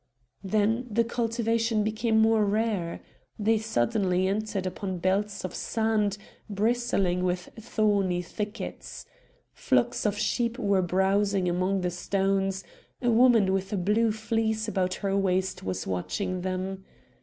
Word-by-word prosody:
Then 215 +5 +1
the 230 +2 +2
cultivation 230 -1 0
became 220 +1 0
more 220 0 +4
rare. 205 -4 -1 0.4
They 220 +1 +2
suddenly 205 -4 +1
entered 200 -1 -2
upon 185 0 -3
belts 195 +3 -1
of 185 - -5
sand 220 -3 0 0.3
bristling 205 -4 +1
with 180 0 -1
thorny 205 -5 +1
thickets. 210 +5 -6 0.5
Flocks 250 -3 +1
of 205 0 -1
sheep 235 +2 0
were 200 -5 +2
browsing 190 +1 +1
among 185 +2 0
the 180 -1 -1
stones; 195 +1 0 0.4
a 245 -2 +1
woman 225 -5 +5
with 195 0 -2
a - - 0
blue 210 +5 +2
fleece 220 0 -1
about 185 -4 0
her 195 0 +1
waist 190 -1 0
was 95 0 -3
watching 95 - -2
them. 190 +1 -3
205 Hz, 130 wpm, -27 LUFS, 185-225 Hz, 0.5 s, woman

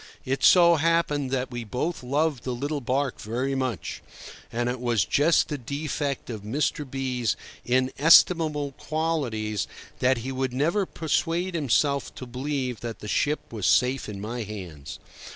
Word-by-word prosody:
It 135 +1 -1
so 170 -2 +7
happened 155 -3 +1
that 130 -1 -2
we 120 -1 -4
both 130 - -3
loved 140 +1 0
the 125 -1 -2
little 145 +3 -3
barque 130 +2 -1
very 125 +5 -2
much. 130 - -3 0.5
And 120 +1 -1
it 125 +1 -2
was 120 -6 +2
just 155 +4 +3
the 150 -2 -4
defect 140 +1 -3
of 110 -3 -6
Mr. 140 +5 -1
B—'s 125 -4 -1 0.3
inestimable 145 +4 +4
qualities 130 -10 -1 0.3
that 130 0 +3
he 125 +3 -4
would 130 -1 -2
never 170 +9 +1
persuade 170 +3 -1
himself 140 -2 +1
to 130 - -7
believe 130 -1 -3
that 115 -1 -5
the 105 - -7
ship 145 +4 -1
was 105 -7 -1
safe 125 +9 +2
in 100 -2 -6
my 115 +4 -4
hands. 90 -9 -7
130 Hz, 150 wpm, -26 LUFS, 120-150 Hz, 0.5 s, so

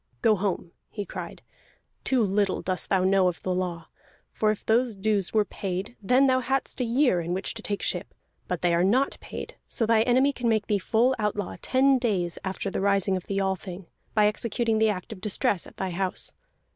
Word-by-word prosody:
"Go 220 - +5
home!" 185 -3 -2 0.2
he 205 -2 -5
cried. - - -7 0.6
"Too 255 -3 +2
little 200 -1 +1
dost 185 -1 -1
thou 190 -2 +3
know 190 0 +4
of 180 - -3
the 185 - 0
law. 180 -2 -3 0.4
For 215 - +1
if 215 - -2
those 235 0 +2
dues 200 -1 0
were 215 -2 +3
paid, 195 +4 -4
then 250 +7 +4
thou 260 -1 +4
hadst 265 +1 -2
a - - +3
year 240 -5 +2
in 170 +2 -2
which 190 - -3
to 225 - -8
take 205 -1 -3
ship. - - -3 0.3
But 180 -1 -3
they 175 -1 +3
are 170 +1 +3
not 250 +9 +2
paid, - - -8
so 230 - 0
thy 220 0 +4
enemy 255 +4 +3
can 240 -2 -1
make 220 -2 +2
thee 205 -1 +1
full 235 +7 +2
outlaw 210 -2 -2
ten 265 0 +3
days 190 -8 -1
after 190 +1 -3
the - - -2
rising 200 -1 +2
of 185 - -5
the 195 0 -1
Althing, 190 -1 -3 0.3
by 210 -1 +5
executing 225 +1 +1
the 220 0 +4
act 200 +1 -4
of 190 - -13
distress 200 -2 0
at - - -16
thy 190 -1 -2
house. 185 +1 -2
205 Hz, 210 wpm, -26 LUFS, 185-230 Hz, 0.6 s, Go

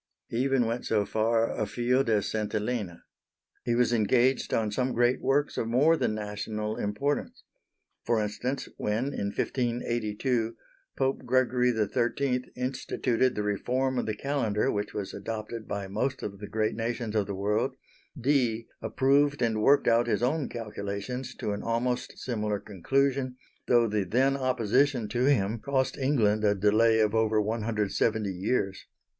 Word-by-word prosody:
He 115 - -3
even 135 -1 +2
went 115 +2 -2
so 105 -2 +2
far 115 +2 +1
afield 120 +4 0
as 105 -2 +2
St. 110 -1 -2
Helena. 105 -5 -3 0.6
He 120 0 0
was 120 0 +2
engaged 120 +4 +2
on 110 -2 +1
some 125 +3 0
great 120 +2 +2
works 145 +2 +1
of 115 - -1
more 140 +8 +4
than 110 - 0
national 105 +1 -4
importance. 120 +8 -2 0.6
For 115 -1 +1
instance, 120 +6 -2
when 115 +7 -1
in 100 - -2
1582, 120 0 -1 0.4
Pope 135 0 0
Gregory 125 -1 +2
XIII 125 +4 0
instituted 125 -1 0
the 105 - -1
reform 125 +5 0
of - - -2
the 110 - -1
Calendar 115 -5 0
which 105 0 -2
was 100 -2 -4
adopted 110 0 -5
by 100 -1 -3
most 125 +7 -2
of 100 -1 -5
the 105 - -7
great 110 +1 0
nations 115 -1 -3
of 105 -2 +1
the 100 - -3
world, 105 +7 0 0.4
Dee 120 -4 +1 0.2
approved 140 +1 +2
and 110 -2 +1
worked 140 +6 +4
out 120 +1 +4
his 120 - 0
own 140 +4 0
calculations 115 +3 -5
to 105 - -3
an 100 - -3
almost 120 +2 -1
similar 105 -4 -2
conclusion, 130 +7 0 0.3
though 120 -1 +5
the 105 -1 0
then 130 +8 +2
opposition 130 -1 +1
to 120 +3 +1
him 110 -5 +2
cost 130 +2 0
England 115 -7 +2
a 105 -1 +3
delay 110 +3 +4
of 105 -1 +2
over 110 -1 +2
one 110 +2 -1
hundred 110 -1 0
and 100 - -3
seventy 110 -4 +1
years. 95 +1 -2
115 Hz, 160 wpm, -28 LUFS, 105-130 Hz, 0.6 s, though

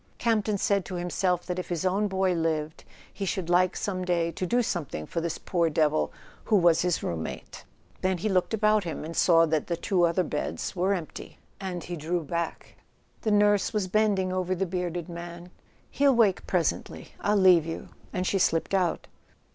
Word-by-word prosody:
Campton 215 -3 +1
said 200 0 +1
to 185 - -6
himself 180 0 -1
that 180 0 -3
if 180 - -6
his 175 0 -2
own 195 +3 +2
boy 190 -1 +1
lived 160 -2 -2 0.3
he 200 - -5
should 185 -2 -2
like 180 +1 +3
some 185 -3 -2
day 170 -2 0
to 185 - -3
do 245 +5 +2
something 150 - -3
for 165 - -3
this 170 -1 -2
poor 170 -3 0
devil 155 0 +1 0.3
who 220 - +2
was 170 -4 +4
his 180 -1 0
room¬ 85 - -3
mate. 80 - -7 0.4
Then 185 0 +1
he 185 - -2
looked 185 -3 +1
about 215 -1 +3
him 165 -3 -5
and 165 +1 -7
saw 165 -2 +5
that 155 -1 -1
the 170 - -1
two 180 0 +1
other 170 +2 +1
beds 150 +5 -3
were 190 +2 +1
empty. 170 -4 -8 0.5
He 175 - -5
drew 170 +2 -2
back. 170 +2 -4 0.4
The 220 - -1
nurse 205 -1 +3
was 210 -3 0
bending 195 -2 +1
over 185 0 -1
the 195 +2 -1
bearded 175 -2 -3
man. 175 0 -8 0.4
"He'll 275 -2 +3
wake 215 -5 +2
presently—I'll 185 +3 -1
leave 180 -4 +5
you"; 165 - -6 0.2
and 185 0 -2
she 195 - +1
slipped 165 +1 +1
out. 180 -4 +1
180 Hz, 185 wpm, -27 LUFS, 170-195 Hz, 0.5 s, saw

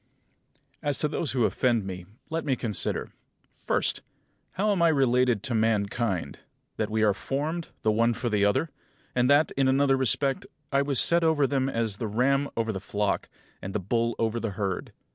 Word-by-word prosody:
18. 145 - -1
As 140 - 0
to 150 - +1
those 150 -1 -2
who 125 -4 +2
offend 120 -5 +1
me, 90 -2 -7 0.2
let 165 0 -1
me 135 -3 0
consider: 110 -5 -1 0.4
First, - - -1 0.5
how 210 +3 0
I - - +4
am 195 -4 0 0.2
related 125 -4 +2
to 125 - -2
mankind; 105 - 0 0.4
that - - -1
we 110 0 0
are 105 -2 +4
formed, 150 - -3 0.2
the 110 - +3
one 115 +2 +2
for 125 - -3
the 105 -3 +1
other; 105 +10 +1 0.4
and 125 +1 +2
that, 145 +2 +4
in 135 -1 +1
another 135 +1 +3
respect, 135 +1 +1 0.2
I 140 0 +3
was 140 -2 +2
set 170 0 +5
over 160 -3 +3
them 135 0 0
as 115 -5 -1
the 115 - -3
ram 135 +6 +1
over 115 -1 0
the 95 - -4
flock, 100 0 -2 0.3
and 95 +1 -6
the - - +1
bull 115 +4 -1
over 115 +1 -1
the 115 -3 -3
herd. 100 -3 -3
120 Hz, 190 wpm, -27 LUFS, 105-140 Hz, 0.5 s, set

